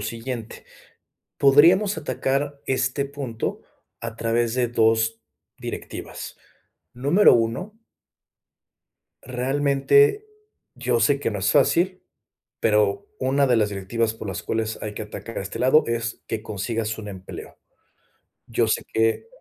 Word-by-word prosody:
siguiente, 115 Hz, +1 st, -6 dB, 0.7 s
podríamos 170 Hz, +8 st, +5 dB
atacar 140 Hz, +1 st, -2 dB
este 130 Hz, +1 st, 0 dB
punto 135 Hz, -5 st, -4 dB, 0.4 s
a 115 Hz, -1 st, -6 dB
través 115 Hz, +1 st, 0 dB
de 125 Hz, -2 st, +1 dB
2 115 Hz, -1 st, +2 dB, 0.4 s
directivas. -, -, -7 dB, 0.6 s
Número 145 Hz, +11 st, +5 dB
1 120 Hz, -, -1 dB, 1.5 s
realmente 140 Hz, -, +2 dB, 0.5 s
yo 120 Hz, -2 st, 0 dB
sé 140 Hz, +6 st, +3 dB
que 115 Hz, -, -1 dB
no 105 Hz, -, -4 dB
es 95 Hz, -, +1 dB
fácil, 180 Hz, +6 st, +2 dB, 0.6 s
pero 105 Hz, -2 st, +2 dB
una 135 Hz, +1 st, +2 dB
de 120 Hz, -2 st, +3 dB
las 105 Hz, -1 st, +2 dB
directivas 110 Hz, +3 st, -1 dB
por 110 Hz, -2 st, -8 dB
las 95 Hz, -, -5 dB
cuales 110 Hz, 0 st, -2 dB
hay 105 Hz, -1 st, -5 dB
que 110 Hz, -, -6 dB
atacar 115 Hz, +2 st, -8 dB
a -, -, -3 dB
este 95 Hz, -, -6 dB
lado 130 Hz, +5 st, +5 dB
es 115 Hz, -1 st, -3 dB
que 110 Hz, -1 st, -3 dB
consigas 110 Hz, +2 st, -3 dB
un 105 Hz, -1 st, -7 dB
empleo. 95 Hz, -1 st, -9 dB, 0.9 s
Yo 115 Hz, 0 st, +1 dB
sé 110 Hz, -, +1 dB
que 110 Hz, -, +1 dB
115 Hz, 125 wpm, -24 LUFS, 110-140 Hz, 1.5 s, podríamos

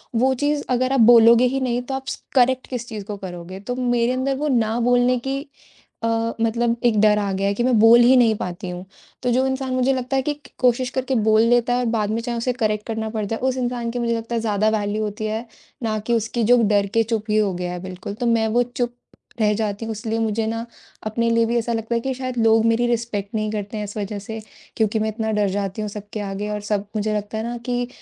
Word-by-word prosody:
वो 260 Hz, +3 st, +3 dB
चीज़ 290 Hz, +2 st, 0 dB
अगर 255 Hz, +1 st, +1 dB
आप 270 Hz, -, +2 dB
बोलोगे 230 Hz, +1 st, +7 dB
ही 265 Hz, +2 st, 0 dB
नहीं, 245 Hz, -1 st, 0 dB
तो 265 Hz, +2 st, -6 dB
आप 265 Hz, 0 st, -5 dB, 0.3 s
करेक्ट 255 Hz, 0 st, +3 dB
किस 245 Hz, -2 st, -5 dB
चीज़ 215 Hz, -3 st, -6 dB
को 210 Hz, -1 st, -5 dB
करोगे, 185 Hz, -1 st, -8 dB
तो 245 Hz, +5 st, -4 dB
मेरे 245 Hz, -1 st, +1 dB
अंदर 265 Hz, +1 st, 0 dB
वो 300 Hz, -, -1 dB
ना 235 Hz, -4 st, +1 dB
बोलने 245 Hz, +1 st, +3 dB
की 275 Hz, +1 st, -1 dB, 0.6 s
अ, -, -, +1 dB, 0.3 s
मतलब 230 Hz, +1 st, +1 dB
एक 220 Hz, -3 st, +3 dB
डर 210 Hz, -1 st, +5 dB
आ 200 Hz, -1 st, -1 dB
गया 195 Hz, +1 st, 0 dB
है 200 Hz, -, +1 dB
कि 235 Hz, -, -1 dB
मैं 250 Hz, -2 st, +3 dB
बोल 225 Hz, +2 st, +8 dB
ही 245 Hz, +2 st, +6 dB
नहीं 230 Hz, -3 st, +4 dB
पाती 180 Hz, 0 st, -5 dB
हूँ। 180 Hz, +1 st, -6 dB, 0.4 s
तो 250 Hz, -, +1 dB
जो 255 Hz, +2 st, +2 dB
इंसान 265 Hz, 0 st, -2 dB
मुझे 255 Hz, +1 st, +2 dB
लगता 255 Hz, +1 st, -2 dB
है 265 Hz, -, +3 dB
कि 295 Hz, -, -1 dB
क 295 Hz, -1 st, -18 dB
कोशिश 250 Hz, 0 st, +2 dB
करके 260 Hz, 0 st, -2 dB
बोल 220 Hz, -1 st, +4 dB
लेता 240 Hz, +1 st, +3 dB
है 245 Hz, -, +1 dB
और 250 Hz, -, 0 dB
बाद 215 Hz, -3 st, 0 dB
में 225 Hz, +2 st, -1 dB
चाहे 235 Hz, 0 st, -3 dB
उसे 250 Hz, +2 st, -1 dB
करेक्ट 215 Hz, -4 st, -1 dB
करना 220 Hz, -1 st, -3 dB
पड़ 215 Hz, -1 st, -3 dB
जाए, 225 Hz, +3 st, -3 dB
उस 260 Hz, 0 st, 0 dB
इंसान 245 Hz, -2 st, -2 dB
की 245 Hz, -, -3 dB
मुझे 235 Hz, -1 st, 0 dB
लगता 230 Hz, +1 st, -4 dB
है 230 Hz, -, 0 dB
ज़्यादा 215 Hz, -1 st, +1 dB
वैल्यू 205 Hz, +1 st, -2 dB
होती 215 Hz, +1 st, -4 dB
है 220 Hz, +2 st, -3 dB, 0.4 s
ना 220 Hz, -1 st, 0 dB
कि 230 Hz, +3 st, -2 dB
उसकी 230 Hz, +1 st, 0 dB
जो 245 Hz, +2 st, +5 dB
डर 205 Hz, -1 st, +2 dB
के 230 Hz, -, +4 dB
चुप 225 Hz, -1 st, -2 dB
ही 215 Hz, -, +2 dB
हो 205 Hz, -3 st, +2 dB
गया 180 Hz, 0 st, -4 dB
है 180 Hz, -, -5 dB
बिल्कुल। 185 Hz, +2 st, -6 dB
तो 230 Hz, +4 st, -4 dB
मैं 230 Hz, -1 st, +2 dB
वो 240 Hz, +3 st, +2 dB
चुप 245 Hz, 0 st, -3 dB, 0.5 s
रह 210 Hz, -1 st, +3 dB
जाती 210 Hz, 0 st, -2 dB
हूँ, 225 Hz, -, -4 dB
इसलिए 220 Hz, +1 st, -3 dB
मुझे 220 Hz, 0 st, 0 dB
ना 230 Hz, +1 st, -3 dB, 0.4 s
अपने 230 Hz, +2 st, 0 dB
लिए 230 Hz, 0 st, +3 dB
भी 235 Hz, +1 st, 0 dB
ऐसा 235 Hz, 0 st, -1 dB
लगता 225 Hz, +1 st, -2 dB
है 235 Hz, -, +2 dB
कि 265 Hz, +2 st, -2 dB
शायद 255 Hz, -1 st, -5 dB
लोग 225 Hz, 0 st, +4 dB
मेरी 230 Hz, +1 st, +2 dB
रिस्पेक्ट 225 Hz, -3 st, -2 dB
नहीं 215 Hz, -1 st, -1 dB
करते 210 Hz, 0 st, -4 dB
हैं 210 Hz, -, -3 dB
इस 205 Hz, 0 st, -7 dB
वजह 205 Hz, 0 st, -3 dB
से 220 Hz, +2 st, -7 dB, 0.4 s
क्योंकि 220 Hz, 0 st, +1 dB
मैं 220 Hz, -, 0 dB
इतना 220 Hz, 0 st, -2 dB
डर 210 Hz, -1 st, +1 dB
जाती 200 Hz, +1 st, -3 dB
हूँ 210 Hz, -, -3 dB
सबके 210 Hz, +1 st, -7 dB
आगे 205 Hz, +1 st, -4 dB
और 210 Hz, -, -2 dB
सब 205 Hz, -1 st, -2 dB
मुझे 215 Hz, 0 st, 0 dB
लगता 210 Hz, +1 st, -5 dB
है 220 Hz, -, -2 dB
ना 240 Hz, +1 st, -4 dB
कि 245 Hz, 0 st, -1 dB
225 Hz, 260 wpm, -22 LUFS, 210-245 Hz, 0.6 s, बोल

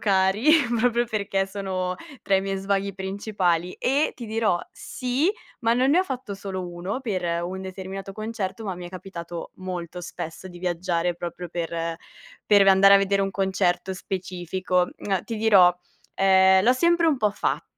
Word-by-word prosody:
cari, 195 Hz, +5 st, +2 dB, 0.3 s
proprio 240 Hz, +1 st, +2 dB
perché 200 Hz, -3 st, -1 dB
sono 190 Hz, -2 st, -3 dB, 0.3 s
tra 195 Hz, -, +1 dB
i 190 Hz, -, +4 dB
miei 195 Hz, 0 st, -2 dB
svaghi 195 Hz, +1 st, -1 dB
principali. 190 Hz, -2 st, -1 dB
E 280 Hz, +4 st, +1 dB
ti 240 Hz, -, -7 dB
dirò, 220 Hz, -4 st, +1 dB
sì, 260 Hz, +7 st, -1 dB, 0.3 s
ma 230 Hz, -1 st, +2 dB
non 255 Hz, +2 st, +3 dB
ne 340 Hz, +5 st, +5 dB
ho -, -, +2 dB
fatto 255 Hz, -, -5 dB
solo 190 Hz, -2 st, -5 dB
uno, 175 Hz, +8 st, -4 dB
per 205 Hz, -8 st, -2 dB, 0.2 s
un 190 Hz, +2 st, -5 dB
determinato 190 Hz, +1 st, -7 dB
concerto, 215 Hz, 0 st, -5 dB
ma 195 Hz, -3 st, -3 dB
mi 175 Hz, 0 st, -8 dB
è -, -, -8 dB
capitato 175 Hz, -2 st, -8 dB
molto 180 Hz, -2 st, -5 dB
spesso 170 Hz, +1 st, -7 dB
di 175 Hz, -1 st, -11 dB
viaggiare 175 Hz, -1 st, -1 dB
proprio 175 Hz, +1 st, -6 dB
per 165 Hz, 0 st, -3 dB, 0.5 s
per 205 Hz, -2 st, +6 dB
v -, -, -1 dB
andare 195 Hz, +1 st, +7 dB
a -, -, +9 dB
vedere 195 Hz, 0 st, +2 dB
un 195 Hz, -, -1 dB
concerto 190 Hz, -1 st, 0 dB
specifico. 180 Hz, -1 st, -2 dB
Uhm, 195 Hz, -2 st, -2 dB
ti 230 Hz, -, -5 dB
dirò, 200 Hz, -5 st, +6 dB, 0.4 s
ehm, 190 Hz, 0 st, +5 dB
l'ho 245 Hz, -, +6 dB
sempre 340 Hz, +5 st, +3 dB
un 310 Hz, -3 st, +3 dB
po' 215 Hz, -4 st, +2 dB
fatto. 205 Hz, -, -2 dB
195 Hz, 170 wpm, -24 LUFS, 180-215 Hz, 0.5 s, a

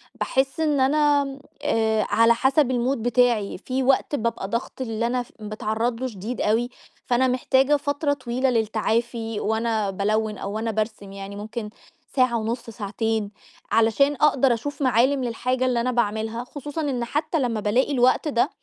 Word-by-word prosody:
باحس 270 Hz, +3 st, -1 dB
إن 300 Hz, -3 st, +2 dB
أنا 290 Hz, +1 st, +3 dB
م 275 Hz, 0 st, -7 dB, 0.2 s
آآ 220 Hz, -6 st, +2 dB
على 230 Hz, +1 st, +5 dB
حسب 265 Hz, +3 st, +2 dB
الmood 255 Hz, +2 st, +1 dB
بتاعي، 240 Hz, -3 st, +1 dB
في 260 Hz, +7 st, -2 dB
وقت 270 Hz, +2 st, +2 dB
بابقى 230 Hz, -6 st, -2 dB
ضغط 235 Hz, +4 st, -4 dB
اللي 230 Hz, -1 st, -1 dB
أنا 250 Hz, +1 st, -1 dB
في -, -, -23 dB
باتعرض 220 Hz, +3 st, -2 dB
له 260 Hz, -, 0 dB
شديد 220 Hz, +1 st, -5 dB
أوي، 230 Hz, +3 st, +1 dB, 0.4 s
فأنا 250 Hz, +1 st, +2 dB
محتاجة 260 Hz, +3 st, +3 dB
فترة 285 Hz, +1 st, 0 dB
طويلة 260 Hz, -1 st, -1 dB
للتعافي 225 Hz, 0 st, -1 dB
وأنا 220 Hz, -1 st, 0 dB
بالوِّن 210 Hz, +2 st, -1 dB
أو 195 Hz, -, -5 dB
وأنا 225 Hz, +1 st, -1 dB
بارسم، 215 Hz, -2 st, -3 dB
يعني 195 Hz, 0 st, -8 dB
ممكن 215 Hz, +1 st, -5 dB, 0.5 s
ساعة 255 Hz, -3 st, +3 dB
ونُص 230 Hz, +2 st, -3 dB
ساعتين 220 Hz, 0 st, -2 dB, 0.4 s
علشان 230 Hz, +6 st, +3 dB
أقدر 275 Hz, -4 st, +3 dB
أشوف 285 Hz, +6 st, -5 dB
معالم 260 Hz, +2 st, +3 dB
للحاجة 255 Hz, +2 st, -1 dB
اللي 245 Hz, -2 st, +1 dB
أنا 255 Hz, -, 0 dB
باعملها، 220 Hz, 0 st, -1 dB
خصوصًا 290 Hz, +4 st, -6 dB
إن 260 Hz, -5 st, -1 dB
حتّى 300 Hz, +6 st, -1 dB
لمّا 240 Hz, -5 st, 0 dB
بالاقي 220 Hz, +7 st, +1 dB
الوقت 255 Hz, +3 st, +3 dB
ده 275 Hz, 0 st, +2 dB
235 Hz, 160 wpm, -24 LUFS, 220-265 Hz, 0.5 s, على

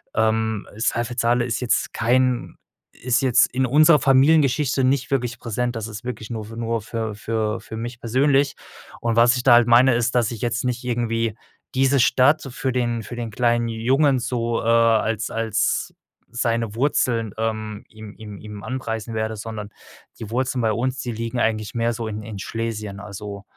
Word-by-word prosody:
ähm, 110 Hz, -1 st, 0 dB
Saalfeld-Saale 120 Hz, +1 st, 0 dB
ist 115 Hz, -, -2 dB
jetzt 120 Hz, -, 0 dB
kein 125 Hz, +1 st, +1 dB, 0.4 s
ist 125 Hz, 0 st, 0 dB
jetzt 125 Hz, -3 st, +4 dB
in 130 Hz, +1 st, +1 dB
unserer 150 Hz, +4 st, +6 dB
Familiengeschichte 135 Hz, 0 st, +3 dB
nicht 130 Hz, 0 st, +1 dB
wirklich 125 Hz, -3 st, -1 dB
präsent, 120 Hz, +1 st, -2 dB
das 110 Hz, -1 st, -4 dB
ist 110 Hz, +1 st, -8 dB
wirklich 115 Hz, -4 st, -6 dB
nur 110 Hz, -2 st, -4 dB
für 115 Hz, +1 st, -10 dB
nur 115 Hz, 0 st, -1 dB
für 110 Hz, -1 st, -4 dB
für 110 Hz, 0 st, -2 dB
für 110 Hz, -, -9 dB
mich 120 Hz, +1 st, -6 dB
persönlich. 135 Hz, +4 st, +2 dB, 0.5 s
Und 115 Hz, -1 st, 0 dB
was 120 Hz, +2 st, +6 dB
ich -, -, -1 dB
da 125 Hz, -, +6 dB
halt 120 Hz, 0 st, +6 dB
meine 120 Hz, +1 st, +6 dB
ist, 120 Hz, 0 st, 0 dB
dass 120 Hz, -3 st, +2 dB
ich 115 Hz, -, -7 dB
jetzt 120 Hz, 0 st, -1 dB
nicht 125 Hz, -1 st, -2 dB
irgendwie 115 Hz, -2 st, -1 dB, 0.4 s
diese 135 Hz, +1 st, +3 dB
Stadt 130 Hz, +5 st, +4 dB
für 130 Hz, +1 st, -2 dB
den 120 Hz, -2 st, -1 dB
für 120 Hz, -, -8 dB
den 115 Hz, -2 st, -5 dB
kleinen 120 Hz, +1 st, +1 dB
Jungen 130 Hz, +4 st, +2 dB
so, 120 Hz, -1 st, -2 dB
äh, -, -, -7 dB
als 115 Hz, -2 st, +2 dB
als 115 Hz, -2 st, -1 dB, 0.4 s
seine 115 Hz, -2 st, -1 dB
Wurzeln, 115 Hz, -5 st, 0 dB
ähm, 110 Hz, -2 st, -3 dB
ihm 110 Hz, -1 st, -11 dB
ihm 105 Hz, -2 st, -10 dB
ihm 105 Hz, -1 st, -9 dB
anpreisen 115 Hz, -4 st, -4 dB
werde, 110 Hz, 0 st, -2 dB
sondern 105 Hz, -1 st, -7 dB, 0.5 s
die 110 Hz, -, -7 dB
Wurzeln 130 Hz, 0 st, -1 dB
bei 110 Hz, -1 st, +2 dB
uns, 130 Hz, +2 st, -2 dB
die 120 Hz, -, -4 dB
liegen 115 Hz, +2 st, -4 dB
eigentlich 110 Hz, -2 st, -1 dB
mehr 115 Hz, 0 st, +1 dB
so 115 Hz, -1 st, -4 dB
in 105 Hz, 0 st, -5 dB
in 110 Hz, -2 st, -7 dB
Schlesien. 105 Hz, -2 st, -4 dB
Also, 100 Hz, 0 st, -8 dB
115 Hz, 180 wpm, -22 LUFS, 110-125 Hz, 0.5 s, unserer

